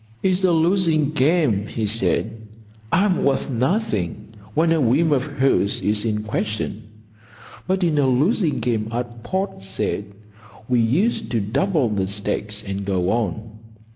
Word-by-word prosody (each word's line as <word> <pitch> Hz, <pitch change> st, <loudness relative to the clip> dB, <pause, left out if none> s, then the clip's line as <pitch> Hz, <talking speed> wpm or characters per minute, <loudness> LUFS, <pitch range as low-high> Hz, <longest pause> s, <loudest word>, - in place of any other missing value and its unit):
"It's 185 Hz, 0 st, +2 dB
a 185 Hz, -, +4 dB
losing 165 Hz, -3 st, +2 dB
game," 145 Hz, -, +2 dB
he 110 Hz, 0 st, -3 dB
said. 110 Hz, +1 st, +1 dB, 0.4 s
"I'm 185 Hz, +1 st, +2 dB
worth 140 Hz, +1 st, 0 dB
nothing 115 Hz, -, -1 dB, 0.3 s
when 160 Hz, +2 st, +3 dB
a 165 Hz, -2 st, +3 dB
whim 140 Hz, +7 st, +3 dB
of 140 Hz, -3 st, +3 dB
hers 135 Hz, -8 st, +1 dB
is 105 Hz, +1 st, 0 dB
in 105 Hz, -1 st, -1 dB
question. 105 Hz, 0 st, -3 dB, 0.9 s
But 190 Hz, 0 st, 0 dB
in 160 Hz, -4 st, +2 dB
a 140 Hz, -, +3 dB
losing 150 Hz, -, +1 dB
game 110 Hz, -3 st, -1 dB
at 120 Hz, 0 st, -4 dB
Port 190 Hz, -, -3 dB
Said 95 Hz, +1 st, -3 dB, 0.6 s
we 125 Hz, -1 st, +2 dB
used 185 Hz, -, +1 dB
to 115 Hz, -, 0 dB
double 140 Hz, -, +1 dB
the 100 Hz, -3 st, -1 dB
stakes 105 Hz, +1 st, -3 dB
and 100 Hz, 0 st, -4 dB
go 95 Hz, -1 st, 0 dB
on. 110 Hz, 0 st, -3 dB
125 Hz, 145 wpm, -22 LUFS, 105-165 Hz, 0.9 s, a